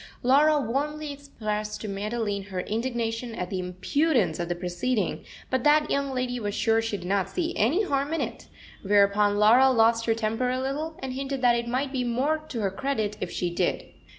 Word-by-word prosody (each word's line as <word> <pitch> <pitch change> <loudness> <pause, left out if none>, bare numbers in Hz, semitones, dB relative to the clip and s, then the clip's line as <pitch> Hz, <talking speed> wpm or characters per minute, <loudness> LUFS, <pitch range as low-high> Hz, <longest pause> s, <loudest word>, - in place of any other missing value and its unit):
Laura 295 +4 +5
warmly 290 +4 -2
expressed 215 -7 -4
to 215 - -6
Madeline 205 0 -3
her 190 -2 -4
indignation 230 +1 -3
at 180 -3 -4
the 190 - -2
impudence 185 - 0
of 170 0 -3
the 175 - 0
proceeding, 180 +4 -2 0.3
but 260 -1 +1
that 300 0 +4
young 280 0 0
lady 250 -1 -2
was 205 -2 -3
sure 225 0 +2
she 225 -2 -2
did 175 - -9
not 195 0 0
see 340 - -2
any 300 - +2
harm 280 -5 -1
in 325 - 0
it; - - -5 0.3
whereupon 205 0 +3
Laura 235 +6 +6
lost 230 -2 +3
her 225 - +3
temper 225 +3 -1
a 255 +1 -1
little, 295 +5 -3
and 260 -1 -3
hinted 270 0 -4
that 240 -1 +5
it 235 0 -2
might 260 +3 -1
be 260 -2 -1
more 260 +6 0
to 230 - -3
her 195 -2 0
credit 215 -2 -2
if - - -2
she 175 -1 -2
did. - - -1
235 Hz, 200 wpm, -26 LUFS, 205-270 Hz, 0.3 s, Laura